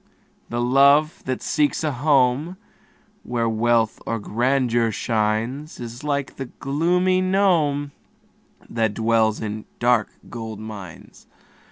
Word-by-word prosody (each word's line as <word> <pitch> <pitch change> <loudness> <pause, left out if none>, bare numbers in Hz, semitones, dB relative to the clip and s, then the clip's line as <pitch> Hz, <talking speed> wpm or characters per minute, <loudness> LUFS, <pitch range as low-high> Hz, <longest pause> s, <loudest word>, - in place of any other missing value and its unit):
The 120 +1 -2
love 140 +5 +4
that 130 -1 -3
seeks 150 0 +1
a 155 - 0
home 140 +4 +2 0.6
Where 120 -1 -1
wealth 115 0 +1
or 115 - -1
grandeur 120 +1 +1
shines, 115 +7 -2
Is 120 +1 -8
like 140 -2 -2
the 135 - -4
gloomy 180 +8 +1
gnome, 170 -7 +2 0.8
That 110 -2 -1
dwells 110 -1 +2
in 110 0 -5
dark 120 -3 +2 0.2
gold 110 -2 -7
mines. 105 -6 -10
125 Hz, 115 wpm, -22 LUFS, 115-145 Hz, 0.8 s, love